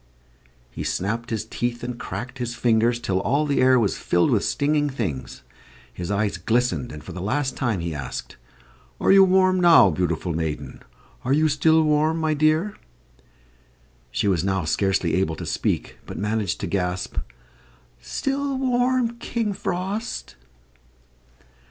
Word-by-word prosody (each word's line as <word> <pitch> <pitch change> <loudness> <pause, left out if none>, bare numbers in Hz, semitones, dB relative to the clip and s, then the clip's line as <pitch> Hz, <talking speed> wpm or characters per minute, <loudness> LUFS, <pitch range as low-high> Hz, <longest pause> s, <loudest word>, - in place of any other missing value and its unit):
He - - -6
snapped 115 +5 -2
his 110 -1 -2
teeth 120 +1 -3
and 120 -1 -5
cracked 130 +1 -6
his 120 -1 -3
fingers, 115 0 +2
till 100 -7 -1
all 140 +8 +1
the 140 -2 +1
air 130 0 +5
was 105 -4 0
filled 85 0 +2
with - - +2
stinging 145 0 +1
things. 95 - -4 0.5
His 90 0 -5
eyes 100 0 0
glistened 120 +1 0
and 75 - -9
for - - -9
the 90 +1 -6
last 135 +8 -1
time 115 -9 -1
he 85 -1 -3
asked, 70 -4 -6 0.6
"Are - - +3
you 195 0 +8
warm, 185 0 +4
now, 165 - +7
beautiful 85 +1 -1
maiden? 75 -4 -4 0.4
Are 130 - +1
you 155 +2 +4
still 160 +2 +3
warm, 155 +1 +2
my 160 -1 +1
dear?" 155 +7 +2 1.4
She 100 - -1
was 90 -4 +2
now 95 -3 0
scarcely 95 +1 +1
able 80 -2 +1
to - - -7
speak, - - -2
but - - -7
managed 105 -2 -1
to - - -1
gasp, 90 -1 -2 0.8
"Still 275 0 -2
warm, 250 -2 +1
King 230 -4 -2
Frost." 195 +5 -4
120 Hz, 150 wpm, -23 LUFS, 95-160 Hz, 1.4 s, you